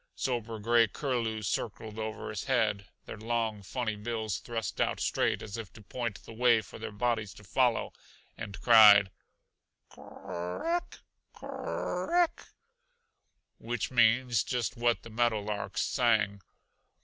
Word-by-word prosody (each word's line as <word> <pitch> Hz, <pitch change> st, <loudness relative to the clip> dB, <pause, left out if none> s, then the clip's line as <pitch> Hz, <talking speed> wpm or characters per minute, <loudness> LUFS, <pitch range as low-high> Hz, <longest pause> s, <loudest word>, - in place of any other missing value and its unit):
Sober 115 Hz, -3 st, -2 dB
gray 115 Hz, +2 st, +4 dB
curlews 115 Hz, -4 st, -2 dB
circled 110 Hz, +3 st, -3 dB
over 110 Hz, 0 st, -4 dB
his 105 Hz, -, -5 dB
head, 110 Hz, -6 st, +1 dB, 0.2 s
their -, -, -8 dB
long, 110 Hz, -2 st, -1 dB
funny 110 Hz, +2 st, -3 dB
bills 110 Hz, -2 st, -3 dB
thrust 115 Hz, -4 st, -4 dB
out -, -, 0 dB
straight -, -, 0 dB
as 105 Hz, +1 st, -6 dB
if 110 Hz, -5 st, -7 dB
to 110 Hz, -, -13 dB
point 115 Hz, 0 st, -5 dB
the -, -, -11 dB
way 120 Hz, -1 st, +4 dB
for -, -, -12 dB
their 110 Hz, -, -5 dB
bodies 110 Hz, -2 st, -1 dB
to 105 Hz, -, -14 dB
follow 120 Hz, +4 st, +1 dB, 0.4 s
and 100 Hz, -2 st, -7 dB
cried, 105 Hz, -4 st, +8 dB, 0.8 s
"Kor -, -, -15 dB
r 90 Hz, +1 st, -5 dB
eck, 350 Hz, -, -5 dB, 0.3 s
kor -, -, -9 dB, 0.6 s
r -, -, +1 dB
eck!" 340 Hz, -, -5 dB, 1.1 s
which 120 Hz, 0 st, -3 dB
means 120 Hz, -1 st, +3 dB
just 120 Hz, -3 st, -2 dB
what 120 Hz, 0 st, +1 dB
the 115 Hz, -, -11 dB
meadow 115 Hz, -1 st, +1 dB
larks 105 Hz, 0 st, -3 dB
sang. 110 Hz, -6 st, +1 dB
110 Hz, 145 wpm, -30 LUFS, 105-120 Hz, 1.1 s, cried